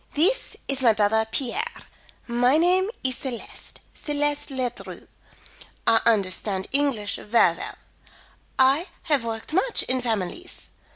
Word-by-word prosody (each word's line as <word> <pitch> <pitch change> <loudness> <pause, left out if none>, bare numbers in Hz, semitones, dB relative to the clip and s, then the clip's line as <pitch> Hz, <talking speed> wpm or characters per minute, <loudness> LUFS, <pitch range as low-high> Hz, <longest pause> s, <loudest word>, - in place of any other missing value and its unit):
"This 425 +12 +2
is 270 -1 0
my 235 -3 +5
brother 220 +1 +2
Pierre. 270 - -1 0.6
My 245 +4 +3
name 365 +4 +3
is 260 -1 0
Celeste; 250 -4 -5
Celeste 290 -1 -1
Ledru. 255 -3 -5 0.8
I 230 -1 +4
understand 195 -2 +1
English 270 -8 0
ver 210 -5 +3
well. - - -7 0.8
I 275 +7 +4 0.2
have 290 -6 +2
worked 225 +4 -4
much 460 +8 +2
in 255 0 0
families. 225 - -4
255 Hz, 120 wpm, -25 LUFS, 225-295 Hz, 0.8 s, my